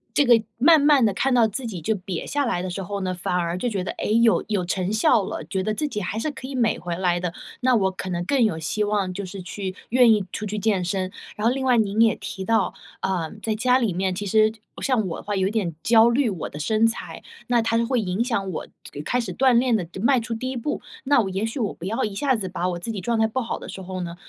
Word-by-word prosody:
这 290 - +4
个 240 -3 +6 0.2
慢 305 +5 +6
慢 285 -4 +5
的 205 - +2
看 270 +7 0
到 240 -3 +5
自 235 +4 -4
己， 195 -6 -5
就 165 +7 0
瘪 185 -3 -5
下 290 0 0
来 235 -9 -1
的 185 - -4
时 195 - -4
候 200 +2 -4
呢， 185 -1 -1
反 180 0 -2
而 170 -1 0
就 215 +7 -1
觉 200 -5 -2
得， - - -3
诶， 215 - -1
有 230 -1 +4
有 205 -4 0
成 185 +1 -1
效 215 0 +4
了， 185 - -5
觉 190 +5 -2
得 215 +3 -1
自 300 - -1
己 210 -7 -4
还 200 +3 -3
是 300 +7 -1
可 265 -2 -8
以 275 - -6
美 235 -3 +1
回 175 -1 -4
来 175 -1 +1
的， 180 -1 -2 0.3
那 255 0 +4
我 190 -4 +2
可 185 0 -6
能 175 -1 -2
更 265 +4 +2
有 215 -8 +1
希 160 +7 -1
望 205 -3 0
就 200 - -5
是 190 0 -8
去 185 +1 -5
愿 245 -1 +6
意 210 -3 +2
出 - - -5
去 210 +1 -3
健 205 -3 +1
身。 185 +1 -2 0.2
然 210 +2 0
后 240 - +3
另 270 0 -3
外 255 -2 +4
您 215 0 +2
也 225 -1 +5
提 190 - -6
到， 220 -1 +1 0.3
呃， 175 -4 -1
在 220 - 0
家 250 +4 +3
里 230 -7 0
面， 185 +1 0
其 205 - -4
实 215 +2 +4 0.3
像 245 -7 +1
我 165 - -4
的 - - -10
话 205 - -2
有 190 -1 +1
一 - - -2
点 195 -8 -1
焦 230 0 +6
虑 245 +1 +2
我 185 - -5
的 - - -9
身 220 +8 +3
材， 225 - -5 0.3
那 240 -1 +3
它 225 0 +1
就 230 - +2
会 250 -1 +1
影 190 +2 -1
响 215 -6 -1
我 160 - -5 0.4
开 245 - +1
始 235 - -5
锻 260 0 +4
炼 240 0 +3
的 180 -6 -2
迈 255 +3 +4
出 230 0 -4
第 255 +3 -3
1 260 - -4
步， 265 +5 -3 0.2
那 280 -1 +4
我 195 - -2
也 190 +3 -1
许 225 +5 -4
我 215 -4 0
不 170 - -9
要 215 +4 -1
一 210 -2 -2
下 265 +4 +2
子 195 -5 -3
把 175 0 -2
我 175 -1 -3
自 200 +6 -4
己 210 - -4
状 230 +4 -1
态 220 - +4
不 225 +4 -2
好 235 -2 -3
的 - - -9
时 190 - -7
候 185 0 -5
呢， 170 -1 -5
215 Hz, 305 characters per minute, -24 LUFS, 185-235 Hz, 0.4 s, 个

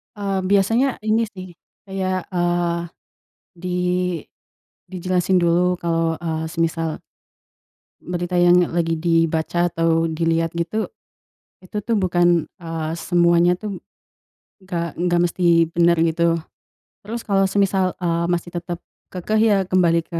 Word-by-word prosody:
Eee, 200 -2 -2
biasanya 225 +7 +2
ini 220 +2 +1
sih 185 -4 -10 0.4
kayak, 185 -1 -2
eee, 175 -1 0 0.8
di 180 +1 -4 1.1
dijelasin 185 0 0
dulu 175 +1 +2
kalau, 165 -1 0
eee, 160 -1 -3
semisal 165 -1 -2 1.0
berita 175 +1 -3
yang 175 0 +6
lagi 165 -1 0
dibaca 165 +1 +1
atau 165 -1 +1
dilihat 165 0 0
gitu, 170 +6 -2 0.7
itu 185 +2 -11
tuh 230 +2 0
bukan, 175 -3 +2 0.2
eee, 160 -1 -4
semuanya 175 0 +3
tuh 205 -3 -6 0.8
nggak 170 -3 -4
nggak 175 0 +1
mesti 170 -2 +3
bener 170 +1 +3
gitu. 165 +1 +1 0.7
Terus 230 +3 -4
kalau 195 -2 +2
semisal, 190 -1 +1
eee, 170 -1 0
masih 175 0 -1
tetap 175 0 -5 0.3
kekeh 190 +4 -1
ya 210 -3 +4
kembali 170 -2 +3
ke 165 0 -6
175 Hz, 120 wpm, -21 LUFS, 165-185 Hz, 1.1 s, yang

